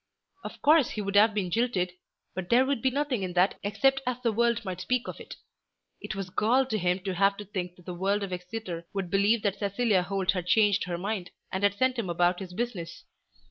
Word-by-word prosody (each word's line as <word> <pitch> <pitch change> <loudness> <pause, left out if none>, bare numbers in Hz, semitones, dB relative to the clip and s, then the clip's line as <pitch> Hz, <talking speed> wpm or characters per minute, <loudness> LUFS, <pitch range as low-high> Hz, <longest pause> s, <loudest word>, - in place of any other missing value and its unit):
Of - - -9
course 300 -2 +5
he 215 - -4
would 200 0 -3
have 210 +1 +6
been 185 -4 -1
jilted, 200 -5 0 0.4
but 185 -1 -5
there 250 +2 +5
would 270 -3 -1
be 265 - +3
nothing 275 -4 -1
in 185 -1 -3
that 180 +2 +2
except 240 +7 +2
as 250 -1 0
the 230 - +2
world 235 +1 +1
might 185 -1 -4
speak 250 +4 -1
of - - -7
it. - - -9 0.7
It - - -5
was 195 -2 -5
gall 250 +8 +3
to 220 -4 -2
him 180 +1 0
to 190 0 -3
have 195 +2 +2
to 210 - -7
think 180 -3 -5
that 180 - -19
the 180 - -5
world 195 +3 0
of 190 -2 -4
Exeter 180 -2 -6
should 190 -3 -3
believe 205 +3 +3
that 200 -2 0
Cecilia 200 -1 +1
Holt 195 +1 0
had 180 -2 -4
changed 205 0 +3
her 175 -1 -3
mind, 190 0 -3 0.2
and 190 - -2
had 200 0 +3
sent 255 +2 +1
him 200 -6 -3
about 175 +1 +2
his 190 -2 -7
business. 185 -6 -4
200 Hz, 230 wpm, -28 LUFS, 180-230 Hz, 0.7 s, have